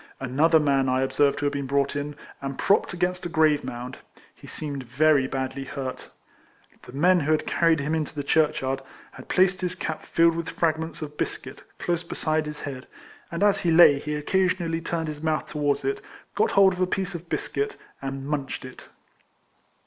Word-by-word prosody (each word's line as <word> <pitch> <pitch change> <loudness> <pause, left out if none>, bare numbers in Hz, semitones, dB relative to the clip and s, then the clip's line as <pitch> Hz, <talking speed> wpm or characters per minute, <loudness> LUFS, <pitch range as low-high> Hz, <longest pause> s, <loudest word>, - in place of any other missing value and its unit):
Another 150 +5 +3
man 135 -3 +2
I 130 0 +2
observed 140 +1 +2
who 145 - -1
had 145 - +1
been 140 -1 -3
brought 140 +1 +1
in, 145 +1 -3 0.3
and 135 -1 -4
propped 200 - +2
against 180 +1 -1
a - - -8
grave 155 -3 +3
mound. 125 +2 -6 0.3
He - - -15
seemed 145 -3 -4
very 135 +3 +3
badly 135 +1 -3
hurt. 135 -1 -6 0.7
The - - -13
men 180 +6 +4
who 155 0 0
had 155 - +2
carried 165 -2 +2
him 145 +3 -1
into 160 -1 -2
the 145 - -3
church 155 +1 +2
yard, 135 +1 -1 0.3
had - - -13
placed 185 0 +3
his 180 0 -2
cap 160 -4 -4
filled 165 0 +3
with 170 -1 -3
frag 160 -2 0
ments 160 0 -6
of 150 0 -9
biscuit - - -4 0.2
close 175 -1 -1
beside 155 -2 -1
his 150 0 -7
head, 130 -3 -6 0.4
and 170 +3 -1
as 205 -1 +4
he 175 - 0
lay 160 -4 +7
he 150 +1 -3
occasionally 175 +1 0
turned 165 -1 -2
his 150 -1 -6
mouth 155 -1 0
towards 145 -1 -1
it, 410 0 -1 0.3
got 445 - +2
hold 195 -1 +7
of 180 - -5
a 185 - +3
piece 190 +1 -2
of 170 0 -8
biscuit, 425 0 -2 0.3
and 135 0 -5
munched 140 -3 -3
it. 130 - -11
155 Hz, 195 wpm, -25 LUFS, 140-170 Hz, 0.7 s, lay